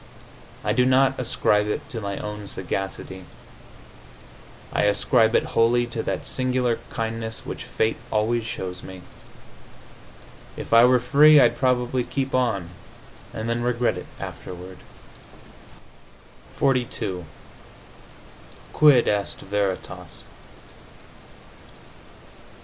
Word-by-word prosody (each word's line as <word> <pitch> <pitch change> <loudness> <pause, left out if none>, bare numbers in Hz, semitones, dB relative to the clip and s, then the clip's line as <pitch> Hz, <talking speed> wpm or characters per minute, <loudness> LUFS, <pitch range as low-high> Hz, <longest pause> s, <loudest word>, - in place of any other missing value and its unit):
I 105 - +1
do 125 +2 +3
not 130 +1 +3
ascribe 105 -4 +1
it 145 +7 -3
to 115 -4 -4
my 100 -1 -4
own 105 -1 -6
sagacity; 95 0 -5 1.5
I - - +2
ascribe 110 +3 +3
it - - +4
wholly 120 +1 +3
to 115 - -2
that - - -3
singular 125 -2 0
kindness 110 0 -4
which - - -6
fate 110 - -1
always 115 +2 +1
shows 95 -4 -5
me. 95 -1 -10 1.5
If - - -5
I 115 +1 +8
were 125 0 +5
free 150 +5 +6
I'd - - +4
probably 125 -1 +1
keep 135 +2 -3
on, 110 -9 0 0.6
and 110 +1 -5
then 115 +1 -1
regret 120 0 0
it - - -8
afterward. 90 +1 -8 1.8
XLII 120 -9 -1 1.5
QUID 145 -6 +5
EST 105 -1 -1
VERITAS? 95 -3 -4
115 Hz, 105 wpm, -24 LUFS, 100-125 Hz, 1.8 s, I